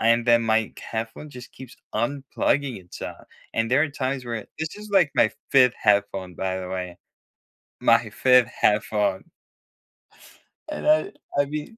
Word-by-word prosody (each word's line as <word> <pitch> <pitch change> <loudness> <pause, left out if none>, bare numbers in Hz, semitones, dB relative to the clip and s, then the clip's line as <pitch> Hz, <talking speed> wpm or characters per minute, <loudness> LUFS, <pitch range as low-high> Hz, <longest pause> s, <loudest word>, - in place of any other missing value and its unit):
and 115 +1 +3
then 115 -1 +5
my 110 -1 +1
headphone 115 +6 -6
just 125 -2 -11
keeps 130 -2 -12 0.2
unplugging 135 +1 -1
itself, 90 - -9 0.3
and 115 +1 0
there 135 +4 +4
are 160 - +1
times 130 -2 -3
where 115 -3 -5
this 160 +4 -4
is, 210 0 -10
like, 180 -7 +4
my 110 - +4 0.2
5th 130 -3 +5
headphone, 100 -3 +1
by 95 0 -2
the 90 - -6
way. 90 -1 -5 0.8
My - - +4
5th 125 -2 +4
headphone. 105 - 0 1.4
And 300 - -5
I 310 +6 +3 0.3
I 145 - +4
mean 150 +9 -6
120 Hz, 150 wpm, -24 LUFS, 105-145 Hz, 1.4 s, then